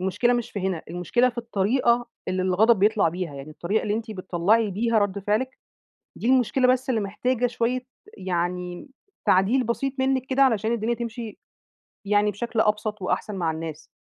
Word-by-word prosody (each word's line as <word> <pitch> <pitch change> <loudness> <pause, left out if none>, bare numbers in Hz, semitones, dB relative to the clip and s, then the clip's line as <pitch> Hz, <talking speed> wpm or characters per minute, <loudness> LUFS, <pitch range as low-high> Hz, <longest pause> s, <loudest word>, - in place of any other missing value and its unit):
المشكلة 190 +6 +1
مش 240 -2 -1
في 200 - -4
هنا، 185 -3 -2
المشكلة 180 +9 +1
في 240 -1 -7
الطريقة 235 +2 +1 0.2
اللي 185 0 0
الغضب 200 +5 +4
بيطلع 205 -2 +3
بيها 170 -2 -4
يعني، 140 +2 -8
الطريقة 175 +7 -1
اللي 205 - -1
أنتِ 225 +1 -4
بتطلعي 195 +3 +1
بيها 225 +4 +1
رد 205 -1 0
فعلِك 215 +6 -1 0.6
دي - - -3
المشكلة، 255 0 +3
بس 255 +1 +2
اللي 230 -4 +1
محتاجة 245 +5 0
شوية 245 +1 -1 0.4
يعني 180 - -3 0.4
تعديل 205 +8 +3
بسيط 260 +4 -1
منك 260 -1 +1
كده، 265 +1 0
علشان 225 -4 +2
الدنيا 235 0 0
تمشي 230 -2 -6 0.7
يعني 210 0 +3
بشكل 225 +2 -1
أبسط 210 0 0
وأحسن 200 +2 -2
مع 170 -4 0
الناس. 160 -1 -7
215 Hz, 165 wpm, -25 LUFS, 185-240 Hz, 0.7 s, الغضب